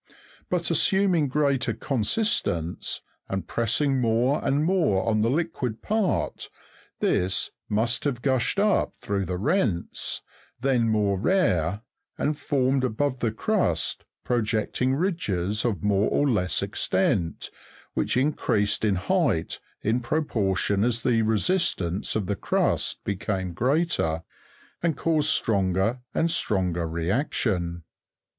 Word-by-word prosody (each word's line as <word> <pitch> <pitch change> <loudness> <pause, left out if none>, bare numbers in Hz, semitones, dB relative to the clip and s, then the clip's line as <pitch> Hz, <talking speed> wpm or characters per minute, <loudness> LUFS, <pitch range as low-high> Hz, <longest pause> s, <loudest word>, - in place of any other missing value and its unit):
But 175 -1 0
assuming 180 -1 +3
greater 135 -4 +1
consistence, 110 - -1 0.3
and 95 -3 -3
pressing 125 +4 +1
more 120 +5 +1
and 145 +3 +1
more 165 - +2
on 110 -1 +2
the 115 - +2
liquid 135 -6 -2
part, 215 -3 -1 0.5
this 90 +1 +1 0.2
must 115 +3 +1
have 125 -4 -2
gushed 130 +4 +1
up 210 0 +2
through 100 -1 -2
the 90 -1 -3
rents, 110 - -1 0.4
then 125 -3 +2
more 105 -3 +1
rare, 100 - +1 0.4
and 150 +1 0
formed 135 -2 +1
above 130 +2 -1
the 115 -3 0
crust 110 - 0 0.2
projecting 120 +2 0
ridges, 105 - -1
of 105 -9 -1
more 105 0 +2
or 145 - +2
less 90 - +1
extent, 95 -3 -1 0.4
which - - 0
increased 120 -8 +1
in 105 -3 +2
height 130 - 0 0.2
in 115 +4 +1
proportion 105 -7 0
as 115 -1 0
the 115 -3 +3
resistance 110 - 0
of 110 -3 0
the. 100 +2 -1
crust - - 0
became 95 -2 -2
greater, 125 - +1 0.6
and 170 -3 0
caused 155 -2 +2
stronger 100 - +2
and 165 +1 +1
stronger 90 - 0
reaction. 85 - -1
115 Hz, 120 wpm, -25 LUFS, 95-145 Hz, 0.6 s, assuming